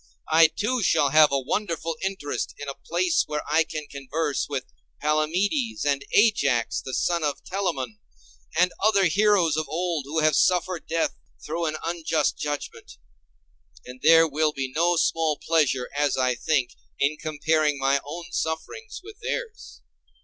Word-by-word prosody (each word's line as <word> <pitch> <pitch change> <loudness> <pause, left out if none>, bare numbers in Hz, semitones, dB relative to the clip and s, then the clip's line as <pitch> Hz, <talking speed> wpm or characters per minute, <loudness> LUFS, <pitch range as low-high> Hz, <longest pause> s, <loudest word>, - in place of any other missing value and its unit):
I, 165 0 +7
too, 235 +8 -2
shall 160 -6 +3
have 155 0 +6
a 140 - +2
wonderful 165 +3 -2
interest 190 -7 -3
in 145 - -7
a 140 - -3
place 175 +3 0
where 150 0 -3
I 155 +2 +3
can 155 -2 -6
converse 140 +1 -3
with 140 -3 -2 0.4
Palamedes, 180 - 0
and 140 -1 +1
Ajax 140 - +3
the 130 - -4
son 170 -2 0
of 145 -2 -2
Telamon, 135 - -3 0.6
and 180 +1 +3
other 200 -2 +4
heroes 190 -2 +3
of 155 -2 -2
old, 165 -2 -2
who 155 +3 -4
have 155 -1 +3
suffered 180 -1 +1
death 165 0 0 0.3
through 165 +2 -2
an 155 0 -2
unjust 165 -3 0
judgment; 145 -10 -5 0.9
and 125 0 -10
there 165 0 +6
will 155 0 0
be 135 -2 -4
no 175 +2 +3
small 160 -2 +1
pleasure, 145 -6 +1
as 145 -1 +1
I 130 -1 +2
think, 125 0 0 0.3
in 145 +2 +1
comparing 155 -1 0
my 135 +1 +1
own 170 +4 -8
sufferings 445 - -4
with 430 +1 -12
theirs. 475 -1 -6
155 Hz, 155 wpm, -25 LUFS, 145-175 Hz, 0.9 s, I